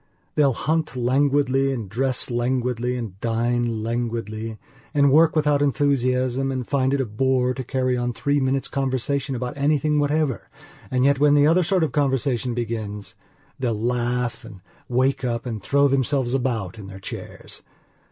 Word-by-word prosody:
They'll 140 Hz, -3 st, +3 dB
hunt 155 Hz, +5 st, -1 dB
languidly 135 Hz, +1 st, +2 dB
and 115 Hz, -6 st, -4 dB
dress 125 Hz, +4 st, -1 dB
languidly 125 Hz, 0 st, -1 dB
and 105 Hz, -6 st, -6 dB
dine 115 Hz, -1 st, 0 dB
languidly 115 Hz, -1 st, -3 dB, 0.4 s
and 140 Hz, -1 st, +4 dB
work 160 Hz, +3 st, +5 dB
without 150 Hz, -2 st, +2 dB
enthusiasm 135 Hz, -2 st, +1 dB
and 130 Hz, -2 st, -3 dB
find 135 Hz, -2 st, +1 dB
it -, -, -1 dB
a -, -, -1 dB
bore 125 Hz, +3 st, +1 dB
to 130 Hz, -, -5 dB
carry 130 Hz, 0 st, 0 dB
on 120 Hz, 0 st, -1 dB
three 145 Hz, +4 st, 0 dB
minutes' 135 Hz, 0 st, 0 dB
conversation 135 Hz, +1 st, -1 dB
about 125 Hz, 0 st, -4 dB
anything 150 Hz, +1 st, +1 dB
whatever 145 Hz, -, 0 dB, 0.4 s
and 130 Hz, 0 st, +1 dB
yet, 140 Hz, -1 st, +3 dB
when 145 Hz, 0 st, +5 dB
the 145 Hz, 0 st, +5 dB
other 165 Hz, +4 st, +4 dB
sort 180 Hz, +1 st, +2 dB
of 155 Hz, -, 0 dB
conversation 135 Hz, -3 st, 0 dB
begins, 110 Hz, -3 st, -4 dB, 0.5 s
they'll 115 Hz, -5 st, -1 dB
laugh 120 Hz, 0 st, -1 dB
and 105 Hz, -5 st, -12 dB, 0.3 s
wake 130 Hz, +2 st, +1 dB
up 120 Hz, -1 st, -2 dB
and 110 Hz, -4 st, -4 dB
throw 140 Hz, +6 st, +3 dB
themselves 135 Hz, -2 st, +1 dB
about 115 Hz, -7 st, -2 dB
in 100 Hz, -, -9 dB
their 95 Hz, 0 st, -9 dB
chairs. -, -, -8 dB
130 Hz, 160 wpm, -23 LUFS, 120-140 Hz, 0.5 s, work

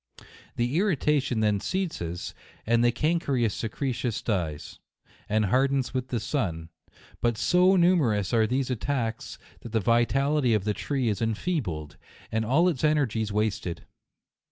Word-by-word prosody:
The 120 Hz, +7 st, 0 dB
irri 195 Hz, -5 st, +2 dB
tation 135 Hz, -6 st, +1 dB
then 105 Hz, -2 st, +2 dB
ceases, 95 Hz, -, -3 dB, 0.3 s
and 115 Hz, +1 st, +3 dB
the 120 Hz, -, +4 dB
cankerous 140 Hz, -5 st, 0 dB
secre 125 Hz, +4 st, -2 dB
tion 120 Hz, 0 st, -2 dB
dies, 85 Hz, -9 st, -3 dB, 0.5 s
and 110 Hz, 0 st, +2 dB
hardens 135 Hz, +5 st, +1 dB
with 130 Hz, -1 st, -2 dB
the 120 Hz, -, -2 dB
sun 85 Hz, -, -2 dB, 0.2 s
5 -, -, -33 dB, 0.3 s
but 120 Hz, -2 st, +1 dB
so 180 Hz, -, +4 dB
numerous 150 Hz, -, +2 dB
are 110 Hz, -1 st, +3 dB
these 130 Hz, +2 st, -1 dB
attacks, 120 Hz, -1 st, -3 dB, 0.2 s
that 115 Hz, -, -10 dB
the 110 Hz, -, +3 dB
vitality 125 Hz, +4 st, +2 dB
of 105 Hz, -, 0 dB
the 105 Hz, 0 st, 0 dB
tree 135 Hz, +2 st, -2 dB
is 105 Hz, -1 st, -1 dB
enfeebled, 110 Hz, -, -2 dB, 0.3 s
and 110 Hz, 0 st, 0 dB
all 145 Hz, +11 st, +3 dB
its 160 Hz, -7 st, -1 dB
energies 125 Hz, -9 st, +1 dB
wasted. 105 Hz, -5 st, -2 dB
120 Hz, 150 wpm, -27 LUFS, 105-140 Hz, 0.5 s, the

